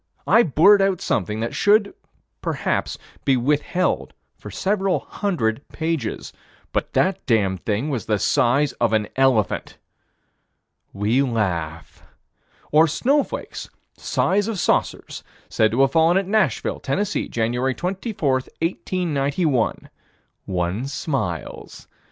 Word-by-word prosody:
I 230 Hz, -, +6 dB
blurt 195 Hz, -, +5 dB
out 195 Hz, -2 st, +1 dB
something 105 Hz, +2 st, -1 dB
that 115 Hz, -, -3 dB
should, 205 Hz, 0 st, +3 dB, 0.5 s
perhaps, -, -, -2 dB, 0.3 s
be 135 Hz, -2 st, +3 dB
withheld 150 Hz, +8 st, 0 dB, 0.2 s
for -, -, -10 dB
several 195 Hz, -1 st, 0 dB
hundred 140 Hz, -, -2 dB
pages 160 Hz, -8 st, -3 dB, 0.4 s
but -, -, -2 dB
that 190 Hz, +1 st, +1 dB
damned 100 Hz, -7 st, +1 dB
thing 115 Hz, +8 st, -1 dB
was 125 Hz, -5 st, -3 dB
the 105 Hz, -, +2 dB
size 135 Hz, +8 st, +2 dB
of 115 Hz, -2 st, +2 dB
an 105 Hz, -1 st, +1 dB
elephant. 130 Hz, -6 st, +1 dB, 1.1 s
We 105 Hz, +6 st, +1 dB
laugh. 90 Hz, -, -2 dB, 0.7 s
Or 155 Hz, +2 st, +6 dB
snowflakes. 275 Hz, -, -1 dB, 0.3 s
Size 205 Hz, +2 st, 0 dB
of 225 Hz, -3 st, -3 dB
saucers. -, -, -1 dB, 0.3 s
Said 110 Hz, -1 st, +2 dB
to 120 Hz, +5 st, +1 dB
have 135 Hz, 0 st, +4 dB
fallen 165 Hz, +3 st, +4 dB
at 195 Hz, -, +1 dB
Nashville, 195 Hz, -, 0 dB
Tenn., 160 Hz, +10 st, -1 dB
Jan. 115 Hz, -, -2 dB, 0.2 s
24, 190 Hz, -, -2 dB
1891. 150 Hz, -2 st, -1 dB, 0.6 s
One 90 Hz, +7 st, -2 dB
smiles. 135 Hz, -, -4 dB
140 Hz, 115 wpm, -22 LUFS, 110-185 Hz, 1.1 s, I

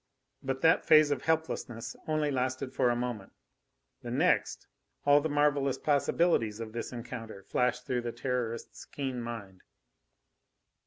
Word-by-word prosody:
But 135 Hz, 0 st, -3 dB
that 160 Hz, 0 st, +4 dB
phase 155 Hz, -1 st, +6 dB
of 140 Hz, -3 st, 0 dB
helplessness 160 Hz, -8 st, -2 dB
only 155 Hz, -1 st, +1 dB
lasted 130 Hz, 0 st, -2 dB
for 125 Hz, -, +2 dB
a 120 Hz, -, +2 dB
moment; 120 Hz, -5 st, -4 dB, 0.7 s
the -, -, -7 dB
next, -, -, +1 dB, 0.4 s
all 145 Hz, +1 st, +6 dB
the 160 Hz, -, -1 dB
marvellous 145 Hz, -2 st, +2 dB
possibilities 140 Hz, -6 st, +1 dB
of 110 Hz, -1 st, -6 dB
this 115 Hz, -, -4 dB
encounter 115 Hz, -4 st, -7 dB
flashed 125 Hz, +4 st, 0 dB
through 125 Hz, -1 st, -1 dB
the 120 Hz, 0 st, -3 dB
Terrorist's 120 Hz, -1 st, -3 dB
keen 130 Hz, -3 st, -4 dB
mind. 105 Hz, -6 st, -7 dB
125 Hz, 140 wpm, -30 LUFS, 115-145 Hz, 0.7 s, phase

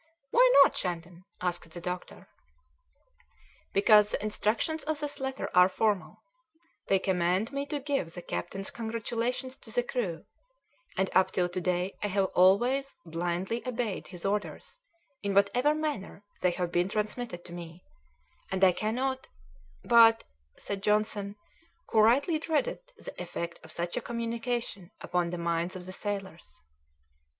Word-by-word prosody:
"Why -, -, +6 dB
not, -, -, +1 dB
Shandon?" 175 Hz, 0 st, -4 dB, 0.2 s
asked 175 Hz, -2 st, -2 dB
the 175 Hz, -, -8 dB
doctor. 180 Hz, +1 st, -6 dB, 1.4 s
"Because 210 Hz, +1 st, +6 dB
the -, -, -3 dB
instructions 215 Hz, +9 st, 0 dB
of 310 Hz, -1 st, -1 dB
this 295 Hz, -1 st, -4 dB
letter 265 Hz, 0 st, -3 dB
are 180 Hz, +1 st, +7 dB
formal: 205 Hz, 0 st, -1 dB, 0.6 s
they 195 Hz, -, +4 dB
command 185 Hz, +4 st, +1 dB
me 280 Hz, 0 st, -3 dB
to 295 Hz, -, -2 dB
give 275 Hz, -, -1 dB
the 175 Hz, -, -7 dB
captain's 195 Hz, +3 st, -4 dB
congratulations 235 Hz, +3 st, -3 dB
to 230 Hz, -, -14 dB
the 245 Hz, +2 st, +1 dB
crew, 215 Hz, -10 st, -3 dB, 0.7 s
and 190 Hz, -, +1 dB
up 185 Hz, -, +5 dB
till 180 Hz, -1 st, +1 dB
to 180 Hz, +1 st, -3 dB
day 180 Hz, +2 st, 0 dB
I 210 Hz, -, 0 dB
have 195 Hz, -1 st, +1 dB
always 245 Hz, +10 st, +4 dB
blindly 175 Hz, +7 st, -2 dB
obeyed 235 Hz, -5 st, -2 dB
his 180 Hz, -1 st, -9 dB
orders 205 Hz, -, -3 dB, 0.4 s
in 200 Hz, -1 st, -1 dB
whatever 245 Hz, +9 st, +4 dB
manner 295 Hz, -10 st, -4 dB, 0.2 s
they 180 Hz, -, +4 dB
have 175 Hz, -1 st, -2 dB
been 175 Hz, +2 st, +1 dB
transmitted 215 Hz, -2 st, -3 dB
to 175 Hz, -, -10 dB
me, 170 Hz, 0 st, -9 dB, 0.7 s
and 190 Hz, 0 st, -1 dB
I 185 Hz, -, +8 dB
cannot 255 Hz, +7 st, -2 dB, 0.3 s
" 70 Hz, 0 st, -29 dB
"But 230 Hz, -1 st, +8 dB, 0.2 s
" 70 Hz, +1 st, -40 dB
said 200 Hz, -1 st, -5 dB
Johnson, 210 Hz, -1 st, 0 dB, 0.6 s
who 220 Hz, -, +4 dB
rightly 275 Hz, -, +4 dB
dreaded 320 Hz, +10 st, 0 dB, 0.2 s
the -, -, -8 dB
effect 170 Hz, -1 st, -5 dB
of 160 Hz, -, -9 dB
such 170 Hz, +1 st, -3 dB
a -, -, 0 dB
communication 235 Hz, -4 st, -3 dB
upon 175 Hz, -1 st, -1 dB
the 175 Hz, -, -4 dB
minds 170 Hz, +1 st, -1 dB
of 180 Hz, -1 st, -7 dB
the 185 Hz, -, -7 dB
sailors. 195 Hz, -4 st, -5 dB
200 Hz, 150 wpm, -29 LUFS, 180-240 Hz, 1.4 s, I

